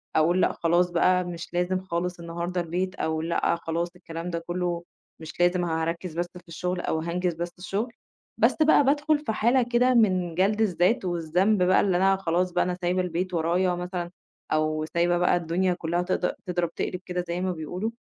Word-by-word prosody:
أقول 170 Hz, +4 st, +3 dB
لأ -, -, +2 dB
خلاص 175 Hz, +1 st, +2 dB
بقي 180 Hz, +1 st, +3 dB
مش 175 Hz, -1 st, -7 dB
لازم 180 Hz, +1 st, 0 dB
خالص 180 Hz, -1 st, -3 dB
النهارده 170 Hz, +1 st, -3 dB
البيت 180 Hz, +3 st, -2 dB
أو 160 Hz, -3 st, -1 dB
لأ 170 Hz, +1 st, +1 dB
خلاص 170 Hz, +1 st, -2 dB
الكلام 170 Hz, -1 st, -6 dB
ده 170 Hz, -1 st, -2 dB
كُلّه 175 Hz, 0 st, -3 dB, 0.4 s
مش 160 Hz, +1 st, -10 dB
لازم 175 Hz, 0 st, +3 dB
هاركِّز 165 Hz, +1 st, -2 dB
بس 175 Hz, -, +1 dB
في 175 Hz, -, -16 dB
الشُغل 180 Hz, +2 st, -3 dB
أو 160 Hz, -, -1 dB
هانجِز 175 Hz, +2 st, -1 dB
بس 170 Hz, +1 st, -4 dB
الشُغل، 210 Hz, +6 st, -3 dB, 0.4 s
بس -, -, +4 dB
بقي 310 Hz, -1 st, +6 dB
بادخل 295 Hz, +2 st, +2 dB
في 295 Hz, -7 st, -3 dB
حالة 240 Hz, +4 st, +3 dB
كده 245 Hz, +1 st, +2 dB
من 185 Hz, -7 st, +2 dB
جَلْد 200 Hz, +4 st, +2 dB
الذات 190 Hz, +2 st, +2 dB
والذنب 180 Hz, +4 st, +1 dB
بقي 185 Hz, +1 st, +4 dB
اللي 185 Hz, -3 st, +2 dB
أنا 195 Hz, +1 st, +4 dB
خلاص 180 Hz, 0 st, 0 dB
بقي 175 Hz, -, +2 dB
أنا 180 Hz, -, -1 dB
سايبة 180 Hz, +1 st, +1 dB
البيت 180 Hz, +1 st, -2 dB
ورايا 175 Hz, +2 st, +1 dB
مثلًا 175 Hz, -1 st, -4 dB, 0.4 s
أو 155 Hz, 0 st, +1 dB
سايبة 175 Hz, +1 st, +2 dB
بقي 180 Hz, 0 st, +3 dB
الدنيا 175 Hz, +2 st, 0 dB
كُلّها 175 Hz, 0 st, -1 dB
تض 180 Hz, +1 st, 0 dB
تضرب 175 Hz, -2 st, -1 dB
تقلب 180 Hz, -, -3 dB
كده 180 Hz, 0 st, -3 dB
زي 170 Hz, +1 st, -2 dB
ما 185 Hz, 0 st, 0 dB
بيقولوا، 180 Hz, +6 st, -4 dB
180 Hz, 190 wpm, -26 LUFS, 170-185 Hz, 0.4 s, بقي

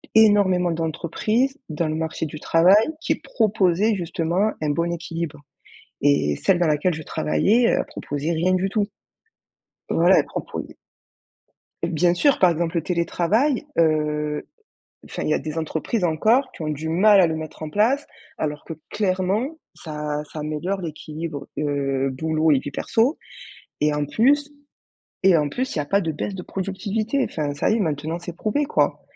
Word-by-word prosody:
énormément 200 Hz, -5 st, +5 dB
d'entreprises 175 Hz, -, -1 dB
dans 160 Hz, +1 st, -1 dB
le 155 Hz, -, -2 dB
marché 160 Hz, 0 st, -2 dB
du 155 Hz, +1 st, -8 dB
travail 170 Hz, +5 st, +5 dB, 0.3 s
qui 320 Hz, -, +1 dB
proposaient 210 Hz, -2 st, +1 dB
justement 175 Hz, +3 st, 0 dB
un 155 Hz, -, 0 dB
bon 170 Hz, +3 st, 0 dB
équilibre 165 Hz, -2 st, -5 dB, 0.6 s
et 140 Hz, -, +3 dB
celle 195 Hz, -, +2 dB
dans 175 Hz, -, +3 dB
laquelle 155 Hz, +4 st, +1 dB
je 160 Hz, -, -7 dB
travaillais, 215 Hz, +11 st, +2 dB
elle -, -, +1 dB
proposait 145 Hz, +3 st, -4 dB
rien 170 Hz, +3 st, +1 dB
du 185 Hz, +1 st, +1 dB
tout. 205 Hz, 0 st, 0 dB, 1.0 s
Voilà, -, -, +4 dB
elle -, -, +1 dB
proposait -, -, -6 dB, 1.1 s
Bien 175 Hz, +1 st, +2 dB
sûr, 285 Hz, +8 st, +3 dB
par 185 Hz, -, +5 dB
exemple, 170 Hz, +1 st, -1 dB
le 165 Hz, -, +1 dB
télétravail, 190 Hz, -, +1 dB
heu, 150 Hz, -2 st, +1 dB, 0.6 s
enfin, -, -, -5 dB
il -, -, -1 dB
y -, -, +3 dB
a -, -, +1 dB
des 155 Hz, 0 st, -6 dB
entreprises 160 Hz, +6 st, -2 dB
encore 220 Hz, -, +2 dB
qui -, -, -11 dB
ont 155 Hz, -, -3 dB
du 155 Hz, +1 st, -3 dB
mal 195 Hz, +4 st, +6 dB
à -, -, +6 dB
le 160 Hz, -, -2 dB
mettre 160 Hz, 0 st, -7 dB
en 155 Hz, -, -4 dB
place, 240 Hz, -, +2 dB, 0.3 s
alors 150 Hz, -1 st, -3 dB
que 165 Hz, -, -6 dB, 0.2 s
clairement 205 Hz, -, 0 dB, 0.2 s
ça 150 Hz, -2 st, -4 dB
ça 155 Hz, -, -6 dB
améliore 155 Hz, +6 st, -3 dB
l'équilibre, 155 Hz, -2 st, -6 dB
heu, 135 Hz, -2 st, 0 dB
boulot 160 Hz, +3 st, +1 dB
et 145 Hz, -, +5 dB
vie 145 Hz, -, -6 dB
perso 230 Hz, -, +1 dB, 0.6 s
et 150 Hz, 0 st, +3 dB
en 150 Hz, 0 st, -1 dB
plus 285 Hz, -, +2 dB, 0.7 s
et 190 Hz, -3 st, +6 dB
en 150 Hz, -2 st, +1 dB
plus 255 Hz, -, -3 dB
il -, -, -2 dB
y -, -, +2 dB
a -, -, -2 dB
pas 195 Hz, +8 st, +2 dB
de 165 Hz, -4 st, -2 dB
baisse 175 Hz, +6 st, -4 dB
de 185 Hz, -, -6 dB
productivité. 210 Hz, +8 st, -2 dB
Enfin 145 Hz, -2 st, -3 dB
ça 145 Hz, -, 0 dB
y 220 Hz, -, +2 dB
maintenant 160 Hz, -1 st, -2 dB
c'est 175 Hz, -1 st, -8 dB
prouvé 220 Hz, +10 st, 0 dB
quoi 285 Hz, -, 0 dB
170 Hz, 170 wpm, -23 LUFS, 155-205 Hz, 1.1 s, mal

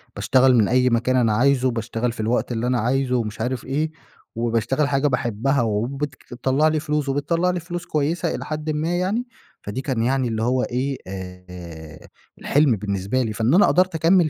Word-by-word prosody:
باشتغل 125 Hz, +5 st, +4 dB
من 110 Hz, -4 st, +4 dB
أي 125 Hz, +2 st, +3 dB
مكان 120 Hz, +2 st, +1 dB
أنا 115 Hz, -4 st, +3 dB
عايزه 130 Hz, +3 st, +3 dB
وباشتغل 115 Hz, 0 st, -2 dB
في 120 Hz, -, -12 dB
الوقت 115 Hz, +3 st, 0 dB
اللي 120 Hz, +1 st, -1 dB
أنا 125 Hz, -1 st, +1 dB
عايزه 125 Hz, +2 st, +1 dB
ومش 110 Hz, -3 st, -2 dB
عارف 125 Hz, -1 st, -2 dB
إيه، 150 Hz, +4 st, -1 dB, 0.4 s
وباشتغل 120 Hz, +5 st, 0 dB
حاجة 140 Hz, +1 st, +1 dB
باحبها 125 Hz, +1 st, 0 dB
وبتك 130 Hz, +6 st, -2 dB
تطلّع 135 Hz, +5 st, +1 dB
لي 155 Hz, 0 st, +1 dB
فلوس 150 Hz, -2 st, -1 dB
وبتطلّع 165 Hz, +6 st, 0 dB
لي 180 Hz, -1 st, -1 dB
فلوس 175 Hz, +1 st, -6 dB
كويسة 160 Hz, +3 st, -1 dB
إلى -, -, -6 dB
حدً 155 Hz, 0 st, -3 dB
ما 160 Hz, +4 st, -1 dB
يعني، 210 Hz, +8 st, -1 dB, 0.3 s
فدي 105 Hz, +6 st, -4 dB
كان 130 Hz, -5 st, -1 dB
يعني 130 Hz, +1 st, +1 dB
اللي 110 Hz, -1 st, -2 dB
هو 125 Hz, +1 st, +1 dB
إيه، 130 Hz, +2 st, -2 dB
آآ 90 Hz, -4 st, -9 dB, 0.3 s
الحلم 145 Hz, -5 st, +3 dB
بالنسبه 100 Hz, +4 st, -1 dB
لي. 110 Hz, -3 st, -2 dB
فإن 115 Hz, +5 st, +1 dB
أنا 195 Hz, +4 st, +6 dB
قدرت 185 Hz, -1 st, +2 dB
أكمّل 165 Hz, +1 st, +4 dB
130 Hz, 185 wpm, -22 LUFS, 115-150 Hz, 0.4 s, أنا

